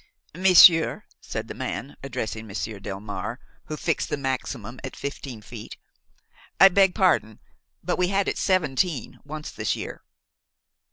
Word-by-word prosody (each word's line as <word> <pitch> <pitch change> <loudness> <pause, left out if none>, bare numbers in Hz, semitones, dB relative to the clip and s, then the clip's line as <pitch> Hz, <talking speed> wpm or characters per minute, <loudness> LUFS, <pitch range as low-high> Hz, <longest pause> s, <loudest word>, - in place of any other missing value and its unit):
"Monsieur," 175 -2 +7 0.2
said - - -5
the - - -6
man, 140 - -5
addressing 110 -4 -5
Monsieur 105 +1 -5
Delmare, 100 +4 -5 0.3
who 155 - -5
fixed 165 0 -1
the 150 - -1
maximum 130 -3 -4
at 135 - -6
fifteen 135 -5 -6
feet, 110 0 -9 0.8
"I 195 - +10
beg 195 0 +4
pardon, 180 - +2 0.4
but - - -1
we 180 - +3
had 195 +1 +1
it - - -1
seventeen 175 -4 0
once 150 +1 -7
this - - -1
year." - - -7
140 Hz, 135 wpm, -25 LUFS, 110-180 Hz, 0.8 s, I